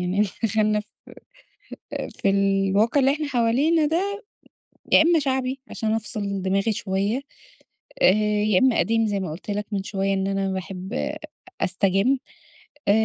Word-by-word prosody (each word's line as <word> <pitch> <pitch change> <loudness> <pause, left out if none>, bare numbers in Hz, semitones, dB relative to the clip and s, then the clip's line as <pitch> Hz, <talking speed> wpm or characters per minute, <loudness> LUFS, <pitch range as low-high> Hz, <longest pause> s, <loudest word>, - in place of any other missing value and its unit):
يعني، 180 +3 0 0.2
دخلنا 215 -1 +2
في 210 - -14 1.4
في - - +4
الواقع 195 +5 +2
اللي 270 +1 +4
إحنا 300 +1 -3
حوالينا 280 +6 +2
ده، 400 +7 -1 0.7
يا - - +8
امَّا 335 +1 +4
شعبي 265 -2 -1
عشان 220 -1 -2
أفصل 205 -3 -3
دماغي 195 +3 +1
شويّة 200 +5 -1 0.8
آآ، 185 - +7 0.3
يا 205 -4 +3
امَّا 260 -3 +3
قديم 225 0 +2
زي 205 -1 -1
ما 185 -5 -4
قلت 175 +6 -7
لك 205 +1 -2
من 195 -1 -2
شويّة 195 0 -1
إن 195 0 -1
أنا 195 -1 -1
باحب 190 +1 -6 0.7
أستجِّم 195 +7 +2 0.7
آآ، - - +5
210 Hz, 145 wpm, -24 LUFS, 195-260 Hz, 1.4 s, يا